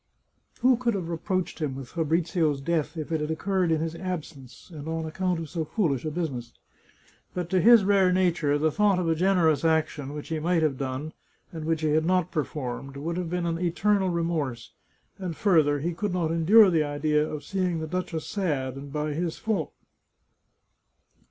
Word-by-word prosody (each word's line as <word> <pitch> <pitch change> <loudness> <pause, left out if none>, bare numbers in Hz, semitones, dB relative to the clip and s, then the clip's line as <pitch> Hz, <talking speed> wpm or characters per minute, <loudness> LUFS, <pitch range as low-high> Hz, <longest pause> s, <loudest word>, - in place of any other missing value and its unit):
Who 255 0 +5
could 235 -3 0
have 175 -4 -3
reproached 180 +2 -2
him 140 -4 -1
with 135 -3 -8
Fa 165 - -1
brizio's 160 -2 +1
death 160 +2 -1
if 155 0 -5
it 160 -2 0
had 150 - -2
occurred 180 +2 0
in 160 -1 +1
his 165 0 -2
absence, 165 -6 -7
and 150 -1 -8
on 160 0 -2
ac 160 - -5
count 185 -1 0
of 165 - -5
so 160 +2 -3
foolish 155 - -1
a - - 0
business? 140 -8 -4 0.8
But 180 -1 -3
to 185 -1 +3
his 230 +1 +7
rare 195 -2 +4
nature, 170 -6 +2
the 155 +1 +1
thought 205 +2 +3
of 180 -2 -1
a 165 - +3
generous 170 -3 +2
action, 155 -3 0
which 150 - -7
he 160 -1 -1
might 165 +1 +1
have 150 -3 +1
done, 135 +3 -4 0.4
and 160 -2 -6
which 160 -1 0
he 155 - +1
had 155 +1 +2
not 185 -2 +1
performed, 140 -3 -4
would 165 +4 -3
have 180 -2 -3
been 175 0 -1
an 165 -1 -1
eternal 190 +3 +1
remorse; 165 -8 -2 0.5
and, 180 -4 -4
further, 155 -8 +3
he 170 +3 -1
could 190 +3 -2
not 170 -3 0
endure 190 +5 +6
the 160 -3 +3
idea 150 +1 +1
of 150 -1 -5
seeing 180 0 -1
the 160 - -3
duchess 165 -1 -3
sad, 140 -10 -2
and 140 0 -9
by 150 +1 -2
his 165 +1 -2
fault. 220 -2 -2
165 Hz, 195 wpm, -26 LUFS, 150-180 Hz, 0.8 s, his